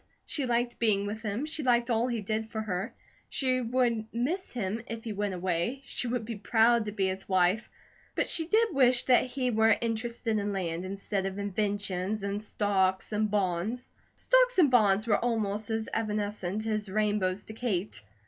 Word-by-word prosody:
She 280 -4 -2
liked 240 0 0
being 205 -3 +2
with 215 +2 -4
him, 220 +5 -2
she 310 0 -3
liked 240 -2 +2
all 230 +2 +2
he 235 -3 -2
did 220 +2 -2
for 220 - -4
her, 190 -3 -3 0.4
she 255 -2 0
would 235 -2 0
miss 300 +12 -2
him 220 -2 -3
if 225 0 -6
he 225 - -4
went 200 -1 -2
away, 180 +9 -1
she 250 - -4
would 235 -2 -2
be 230 -1 -5
proud 230 +1 +3
to 210 - -3
be 200 -2 0
his 190 +1 -3
wife, 185 +4 +2 0.5
but - - +1
she 325 -2 +4
did 440 +1 +3
wish 255 -3 +5
that 255 0 +4
he 255 -1 -1
were 220 -1 +4
interested 230 -1 -2
in 205 0 -2
land, 175 -2 -3
instead 195 0 -2
of 195 0 -5
inventions 200 0 -1
and 200 +1 -2
stocks 195 -3 0
and 215 0 0
bonds. 205 +4 -1 0.2
Stocks - - +3
and 310 -8 +5
bonds 215 -3 +4
were 210 -3 +3
almost 215 -3 -1
as 220 0 -2
evanescent 210 -2 -2
as 215 -2 -1
rainbows 205 -2 0
to 220 - -10
Kate. 210 - -2
215 Hz, 185 wpm, -29 LUFS, 200-240 Hz, 0.5 s, wish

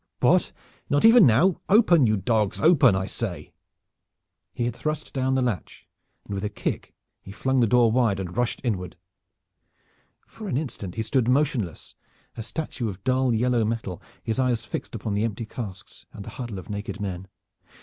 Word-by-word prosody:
What, - - +3 0.4
not 145 +8 +3
even 225 - +8
now! 155 - +3
Open, 180 - +5
you 110 0 +2
dogs. 105 +1 0
Open, 145 - +5
I 95 0 -1
say!" - - -5 1.0
He 120 - -2
had 120 -1 -2
thrust 155 +2 -4
down 130 0 0
the 130 - +2
latch, 120 -7 -4 0.4
and - - -6
with 100 0 -3
a 105 - -1
kick 105 - -4 0.3
he 95 - -11
flung 130 +5 0
the 120 - +4
door 120 0 +4
wide 115 -5 +2
and 90 -2 -5
rushed 120 0 -1
inward. 95 -8 -2 1.3
For 220 -2 -10
an 150 - -1
instant 120 - -5
he 110 - -1
stood 120 +1 +1
motionless, 130 - 0 0.4
a - - -5
statue 125 -2 -4
of 95 -1 -9
dull 130 0 +2
yellow 120 +1 +2
metal, 110 -5 -3 0.2
his 115 +3 -2
eyes 120 -3 +1
fixed - - -6
upon 110 -1 -3
the 105 +1 0
empty 115 0 -3
casks 110 -4 -9
and 100 - -9
the - - -8
huddle 120 -5 -6
of 95 - -9
naked 105 +1 -5
men. 95 -2 -5
115 Hz, 180 wpm, -25 LUFS, 105-130 Hz, 1.3 s, even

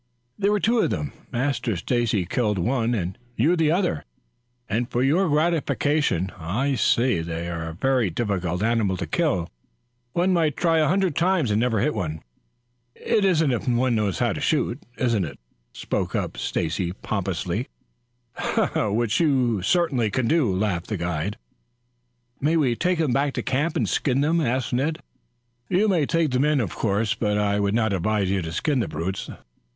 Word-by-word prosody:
"There 200 0 +2
were 210 - +2
two 230 +3 +2
of - - +2
them. 75 -2 -3 0.2
Master 125 -3 -1
Stacy 110 -1 0
killed 105 +2 0
one 120 +4 0
and 95 0 -3 0.2
you 155 +10 +3
the 160 -3 +2
other, 170 - 0 0.6
and 120 +3 -1
for 120 - 0
your 165 +7 +3
gratification 150 - +1
I'll 120 - -1
say 120 -6 +2
that - - -6
they 85 +1 -3
are 85 -1 -4
a 80 - -8
very 130 0 +1
difficult 90 -2 -2
animal 110 -5 +1
to 90 - -3
kill. 85 +2 0 0.7
One 180 +2 +2
might 160 -6 +1
try 165 -2 +2
a 155 - +3
hundred 185 -3 +1
times 170 - +2
and 105 - +2
never 115 -3 +1
hit 150 +6 +1
one." 80 -2 -4 0.7
"If 160 - +1
one 125 0 +2
knows 105 -6 0
how - - +1
to - - -5
shoot, 120 +5 0 0.2
it - - 0
isn't," 100 - -1 0.3
spoke - - -3
up - - -2
Stacy 85 +2 -2
pompously. - - -3 1.1
"Which 110 +2 +1
you 130 - +2
certainly 135 - +1
do," 130 - +1
laughed 95 -2 -1
the 105 - -2
guide. 85 +4 -2 1.0
"May 155 +4 +2
we 130 -6 +2
take 180 +6 0
them 155 -6 +1
back 140 +1 +1
to - - -2
camp 150 +5 0
and - - +1
skin 135 -1 +1
them?" 165 +3 +2
asked 130 -2 -1
Ned. 145 +6 0 0.7
"You 200 +4 +3
may 170 -8 +2
take 165 -4 +1
them 125 +2 +2
in, 150 -1 +2
of 105 -8 -2
course; 105 0 0
but 105 -2 0
I 105 -1 +1
would 100 +1 +1
not 110 -3 +1
advise 100 +1 0
you 100 -1 +1
to 80 -1 -5
skin 140 - 0
the 115 - 0
brutes. 85 +5 -4
120 Hz, 175 wpm, -24 LUFS, 100-150 Hz, 1.1 s, you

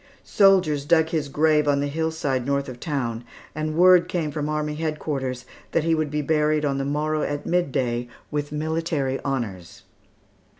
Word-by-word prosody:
Soldiers 185 -8 +3
dug 160 +1 +3
his 155 -3 -2
grave 150 +1 +2
on 140 -1 +3
the 140 - 0
hillside 155 -4 -1
north 140 +2 -1
of 125 -2 -8
town, 125 -7 -3 0.3
and 155 0 -3
word 180 -1 +6
came 160 -4 -2
from 150 0 -3
army 150 0 -1
headquarters 150 -5 -3 0.3
that 165 - +2
he 165 0 +2
would 155 -2 0
be 150 +1 -2
buried 150 0 +1
on 140 -1 0
the 135 - -2
morrow 150 +2 -1
at 145 -1 -3
midday, 130 -8 0 0.2
with 145 -1 -3
military 150 -3 -1
honors. 110 -11 -4
150 Hz, 165 wpm, -24 LUFS, 140-160 Hz, 0.3 s, word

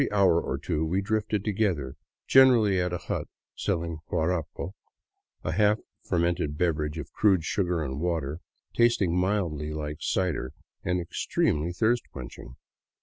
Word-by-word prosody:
Every - - 0
hour 95 -4 +4
or - - -2
two 75 - -1
we 85 +4 0
drifted 105 0 -1
together, 95 -11 0 0.3
generally 115 -8 +6
at 90 0 -1
a 90 - -1
hut - - -4 0.3
selling 85 -1 -2
guarapo, 85 +2 -1 0.7
a 80 - -1
half 105 +4 +3 0.3
fer - - 0
mented 85 -3 0
beverage 75 -3 0
of - - -6
crude 95 -6 +3
sugar 90 -2 0
and 65 -1 -4
water, 80 -3 -1 0.4
tasting 115 -7 +3
mildly 90 -6 0
like 75 -1 -4
cider 85 -10 -1 0.3
and 90 0 0
extremely 85 -1 0
thirst 115 +6 +1
quenching. 65 -1 -9
85 Hz, 145 wpm, -27 LUFS, 75-100 Hz, 0.7 s, generally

